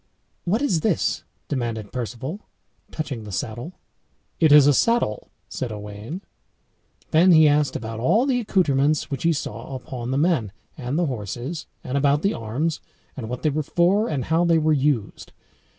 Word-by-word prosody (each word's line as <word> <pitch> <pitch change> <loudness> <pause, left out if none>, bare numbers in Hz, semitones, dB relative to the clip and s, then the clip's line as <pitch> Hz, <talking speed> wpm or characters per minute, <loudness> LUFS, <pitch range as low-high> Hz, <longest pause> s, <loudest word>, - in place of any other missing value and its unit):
"What 215 +10 +1
is 180 - +1
this?" 190 -4 0 0.2
demanded 115 -6 -3
Perceval, 125 - -4 0.5
touching 135 -8 -5
the 105 - -8
saddle. 120 - -4 0.7
"It 160 -3 +5
is 145 -1 +9
a 145 - +6
saddle," 230 - +1 0.2
said 125 -3 -4
Owain. 105 - -7 0.9
Then 170 +4 +6
he 155 -1 +7
asked 150 0 +2
about 110 0 -5
all 215 - +3
the 260 -3 +1
accoutrements 155 - +1
which 135 - -3
he 170 - +3
saw 130 -3 -4
upon 125 -1 -6
the 130 - 0
men 140 - +1 0.2
and 125 +4 -3
the 175 - +2
horses, 125 - -5 0.2
and 135 +2 -1
about 145 +1 +2
the 200 - +2
arms, 125 +9 -2 0.4
and 115 -5 -6
what 125 0 -5
they 155 - +2
were 155 +2 0
for, 180 +8 +2
and 140 -5 -2
how 165 +2 +2
they 170 -1 +4
were 155 0 +3
used. 135 -7 -1
145 Hz, 165 wpm, -23 LUFS, 120-165 Hz, 0.9 s, is